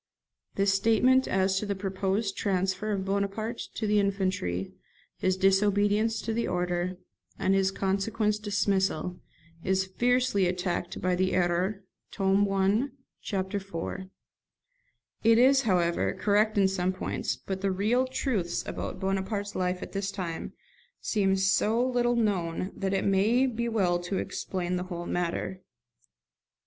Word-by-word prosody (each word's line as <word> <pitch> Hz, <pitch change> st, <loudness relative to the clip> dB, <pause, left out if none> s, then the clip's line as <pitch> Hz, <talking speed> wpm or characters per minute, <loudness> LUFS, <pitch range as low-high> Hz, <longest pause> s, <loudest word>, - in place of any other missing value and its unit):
[This 195 Hz, 0 st, +2 dB
statement 230 Hz, +6 st, +3 dB
as 190 Hz, 0 st, +2 dB
to 210 Hz, -, -4 dB
the 200 Hz, -, -1 dB
proposed 195 Hz, +1 st, -1 dB
transfer 190 Hz, +1 st, -1 dB
of 195 Hz, -2 st, -1 dB
Bonaparte 200 Hz, +4 st, -2 dB, 0.2 s
to 220 Hz, -, -2 dB
the 210 Hz, 0 st, +3 dB
infantry, 185 Hz, -, -1 dB, 0.5 s
his 185 Hz, 0 st, +1 dB
disobedience 205 Hz, +3 st, +2 dB
to 225 Hz, -, -2 dB
the 235 Hz, +1 st, -1 dB
order, 180 Hz, 0 st, -1 dB, 0.4 s
and 190 Hz, -, +1 dB
his 195 Hz, 0 st, +3 dB
consequent 210 Hz, +2 st, 0 dB
dismissal, 190 Hz, -4 st, 0 dB, 0.4 s
is 190 Hz, 0 st, +1 dB
fiercely 245 Hz, 0 st, +2 dB
attacked 180 Hz, -1 st, -2 dB
in -, -, -8 dB
the 185 Hz, +1 st, +1 dB
'Erreurs', 180 Hz, +3 st, 0 dB, 0.3 s
tome 195 Hz, +1 st, +2 dB
i. 195 Hz, +6 st, +2 dB, 0.3 s
chap. 190 Hz, -1 st, -3 dB
iv. 195 Hz, -3 st, -5 dB, 1.5 s
It 225 Hz, 0 st, +6 dB
is, 265 Hz, +3 st, +6 dB
however, 180 Hz, -7 st, +1 dB
correct 210 Hz, +3 st, +2 dB
in 195 Hz, -1 st, +5 dB
some 185 Hz, -1 st, 0 dB
points; 185 Hz, -, -3 dB
but 190 Hz, -1 st, -5 dB
the 200 Hz, -, +1 dB
real 215 Hz, +7 st, +1 dB
truths 225 Hz, -9 st, -1 dB
about -, -, -5 dB
Bonaparte's 195 Hz, +1 st, -2 dB
life 180 Hz, 0 st, -1 dB
at -, -, -8 dB
this 195 Hz, 0 st, -2 dB
time 175 Hz, -5 st, -5 dB, 0.5 s
seem 195 Hz, -3 st, +1 dB
so 195 Hz, +4 st, +2 dB
little 240 Hz, -1 st, +1 dB
known 190 Hz, -5 st, 0 dB
that 195 Hz, 0 st, -1 dB
it 190 Hz, -, 0 dB
may 210 Hz, +7 st, +3 dB
be 235 Hz, -2 st, -1 dB
well 185 Hz, -6 st, +1 dB
to 175 Hz, +2 st, -3 dB
explain 180 Hz, -1 st, -3 dB
the 180 Hz, -, -3 dB
whole 175 Hz, -1 st, -5 dB
matter. 175 Hz, +2 st, -2 dB
195 Hz, 140 wpm, -28 LUFS, 185-210 Hz, 1.5 s, It